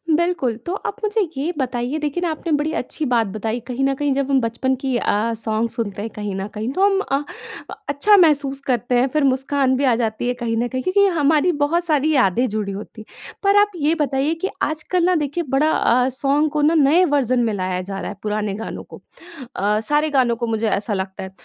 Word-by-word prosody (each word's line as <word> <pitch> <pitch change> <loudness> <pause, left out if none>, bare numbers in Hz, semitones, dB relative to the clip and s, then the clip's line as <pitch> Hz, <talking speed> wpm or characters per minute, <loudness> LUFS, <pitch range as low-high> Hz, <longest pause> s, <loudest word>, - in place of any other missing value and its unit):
बिल्कुल। 335 -8 0
तो 350 - -2
आप 405 - -2
मुझे 430 +1 +1 0.2
ये 300 +6 -1
बताइए 250 +1 -2
देखिए 300 +3 -2
ना 345 - 0
आपने 320 +1 -5
बड़ी 300 +2 -1
अच्छी 310 - -4
बात 230 -2 +2
बताई 220 +3 -2
कहीं 255 +1 -2
न 275 - +2
कहीं 290 +1 -1
जब 275 0 -1
हम 270 - +4
बचपन 245 +3 -1
की 265 0 -2
अ, 225 +1 0
सॉन्ग 220 +1 -1
सुनते 205 -4 -4
हैं, 225 - -4
कहीं 210 -2 -4
न 195 +1 -4
कहीं 220 +4 -3
तो 380 - +1
हम 390 -1 +3
अ, 280 -6 -1 0.7
अच्छा 405 +9 +4
महसूस 285 -6 +3
करते 245 -1 0
हैं। 255 - +3
फ़िर 305 -2 +2
मुस्कान 265 0 +1
भी 275 - -1
आ 255 -4 +4
जाती 220 +1 -2
है 245 - +1
कहीं 230 -1 -1
न 240 +2 0
कहीं 255 +1 -3
क्योंकि 400 +2 +3
हमारी 305 +3 +3
बहुत 340 +4 +1
सारी 310 -1 +2
यादें 245 0 +3
जुड़ी 205 -1 -3
होती 215 +2 -9
हैं। - - -14
पर 400 +1 +4
आप 415 0 +1
ये 310 0 +1
बताइए 285 0 0
कि 385 - +1
आजकल 315 +3 -1
ना 365 0 +3
देखिए 300 +2 -1
बड़ा 280 +3 +2
अ, 250 +2 +2
सॉन्ग 285 +3 +1
को 300 0 0
ना 310 +3 +4
नए 310 +4 +5
वर्ज़न 255 -3 +2
में 225 -2 0
लाया 185 -2 -2
जा 195 +1 -6
रहा - - -4
है, 205 - -8
पुराने 210 -1 -2
गानों 225 +2 -6
को। - - -13 0.5
अ, 210 +2 +1
सारे 295 +7 +1
गानों 255 -4 +2
को 235 0 -3
मुझे 225 0 0
ऐसा 205 +1 -1
लगता 190 -1 -4
है। 190 - -8
265 Hz, 230 wpm, -20 LUFS, 225-305 Hz, 0.7 s, नए